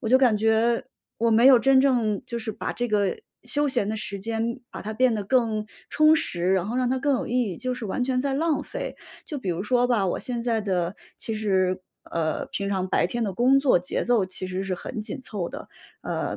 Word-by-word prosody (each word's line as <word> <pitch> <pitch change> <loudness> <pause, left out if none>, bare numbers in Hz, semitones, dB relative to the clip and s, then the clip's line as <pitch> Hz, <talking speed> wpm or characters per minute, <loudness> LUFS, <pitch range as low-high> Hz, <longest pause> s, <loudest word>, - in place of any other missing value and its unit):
我 225 - -3
就 255 - +6
感 255 -4 +4
觉 225 +2 +2 0.3
我 230 0 +2
没 225 +2 +4
有 265 -2 +9
真 270 +2 +4
正 235 -7 +1
就 235 - -4
是 230 -1 -3
把 210 - -4
这 245 - -2
个 205 -3 +1 0.3
休 290 +4 +1
闲 240 -6 0
的 220 - -2
时 200 -1 -3
间， 230 +4 -2
把 - - -7
它 215 - -4
变 250 +1 +3
得 210 - -2
更 220 -2 +1 0.2
充 310 +1 +5
实， 180 - 0
然 190 -1 +1
后 230 - -3
让 255 -1 +1
它 260 - +1
更 280 +1 +1
有 250 - -2
意 - - -4 0.2
义， - - -7
就 255 +7 -3
是 245 -3 -5
完 205 - -2
全 255 0 0
在 275 0 -1
浪 315 +2 +1
费。 - - -5 0.3
就 295 - -5
比 220 - -6
如 175 +1 -1
说 245 +3 +2
吧， 235 -5 +2
我 - - -1
现 240 -2 -3
在 230 -2 0
的 185 -3 -1 0.2
其 225 - -4
实， 190 -4 +1 0.3
呃， 160 -2 -1
平 200 0 -3
常 190 -2 -1
白 - - +2
天 235 +5 -3
的 200 - -2
工 255 +7 +4
作 275 -9 +4
节 180 - -3
奏 235 -5 +3
其 185 0 -4
实 185 +1 -3
是 190 -1 -2
很 215 - -6
紧 260 +6 -5
凑 200 -9 -4
的， - - -9 0.3
呃， - - -3
225 Hz, 255 characters per minute, -25 LUFS, 200-255 Hz, 0.3 s, 有